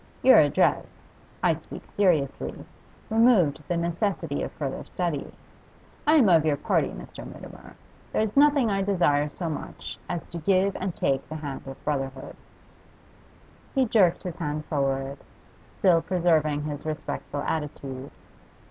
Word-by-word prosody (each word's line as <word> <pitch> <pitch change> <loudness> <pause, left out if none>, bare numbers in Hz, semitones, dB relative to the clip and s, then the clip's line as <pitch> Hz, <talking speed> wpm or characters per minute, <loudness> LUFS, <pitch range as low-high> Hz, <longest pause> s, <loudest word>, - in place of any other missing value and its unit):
Your - - +8
address - - +1 0.4
I - - +4
speak - - -9
seriously 170 -9 0 0.5
removed 220 - +4
the 175 - 0
necessity 170 -3 -1
of - - -3
further 140 -3 -4
study. 170 -6 -3 0.8
I 305 - +6
am 270 -9 +6
of 165 -4 +5
your 150 -2 +1
party, - - +1
Mr. - - -9
Mutimer. - - -11 0.4
There - - +1
is 215 -1 -3
nothing 280 -5 +5
I 195 0 +1
desire 160 -7 +2
so 170 +3 -5
much 155 - -6
as 175 -2 -3
to 170 - -7
give 190 +4 +2
and 185 -2 -3
take 135 -1 0
the 155 - -5
hand 145 -3 -6
of 135 - -10
brotherhood.' 135 -2 -3 1.4
He 265 -1 +4
jerked 200 -7 +3
his 180 -3 -5
hand 150 -2 -3
forward, 135 -1 -1 0.6
still 175 -3 +4
preserving 160 -5 +1
his 150 -1 -5
respectful 155 -2 -4
attitude. 140 -3 -4
160 Hz, 140 wpm, -26 LUFS, 145-190 Hz, 1.4 s, Your